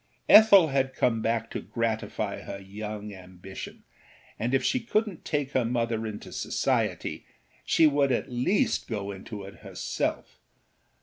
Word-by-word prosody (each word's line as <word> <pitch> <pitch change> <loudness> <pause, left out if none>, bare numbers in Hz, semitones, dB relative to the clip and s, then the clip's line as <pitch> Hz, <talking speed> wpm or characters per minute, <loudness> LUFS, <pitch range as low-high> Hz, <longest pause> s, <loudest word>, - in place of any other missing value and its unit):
Ethel 200 -6 +8
had 135 -1 0
come 115 -3 +1
back 115 0 -1
to - - -4
gratify 115 -2 -3
her 100 - -7
young 105 +1 -7
ambition, 95 0 -10 0.6
and 120 +5 0
if 135 - +1
she 255 - +1
couldnât 215 -5 -1
take 145 -3 -2
her 130 -3 +2
mother 115 -1 -1
into 105 -1 -8
society - - -1 0.4
she 165 - +4
would 140 -2 +3
at 125 - 0
least 155 - +1
go 100 -3 -3
into 100 +1 -8
it 100 +1 -11
herself. - - -4
115 Hz, 140 wpm, -27 LUFS, 105-140 Hz, 0.6 s, Ethel